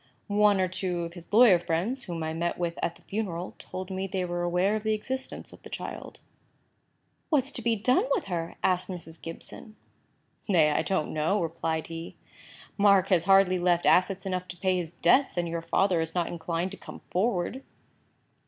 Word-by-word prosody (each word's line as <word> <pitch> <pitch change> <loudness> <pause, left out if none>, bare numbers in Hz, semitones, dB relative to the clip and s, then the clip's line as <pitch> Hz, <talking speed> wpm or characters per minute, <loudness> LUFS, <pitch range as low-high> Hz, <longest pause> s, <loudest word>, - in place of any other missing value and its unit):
One 205 -1 +3
or 185 - +2
two 180 -1 -2
of 170 0 -6
his 175 -2 -13
lawyer 215 -5 +7
friends, 180 +10 -2
whom 170 -4 -4
I 160 0 -2
met 170 +1 -2
with 170 -1 -3
at 170 - -1
the - - -21
funeral, 190 -4 -4
told 185 +1 -7
me 190 +1 -2
they 185 -1 -2
were 175 0 -3
aware 180 +4 +1
of 215 - -2
the 215 0 +1
existence 260 +5 -6
of - - -15
the - - -12
child." - - -7 1.1
"What 285 -5 +3
is 280 - -8
to 245 - -5
be 230 0 +2
done 250 +5 +2
with - - +1
her?" 170 -3 -4
asked 185 0 +1
Mrs. 170 -3 -8
Gibson. 165 +6 -9 0.7
"Nay, 160 -6 +5
I - - +2
don't 190 -6 -1
know," 155 +7 +1
replied 160 -2 -2
he. 165 0 -7 0.6
"Mark 200 -2 +5
has 175 -3 +3
hardly 195 -1 +5
left 175 -1 +2
assets 185 +1 +3
enough 185 -1 -2
to 175 - -9
pay 185 +1 +1
his 170 -3 -3
debts, 220 +9 +3
and 175 -1 0
your 165 0 -3
father 170 +1 +2
is 160 +1 -4
not 175 -1 +1
inclined 170 +2 -3
to 200 - -8
come - - -11
forward." 195 +4 0
180 Hz, 195 wpm, -28 LUFS, 170-200 Hz, 1.1 s, lawyer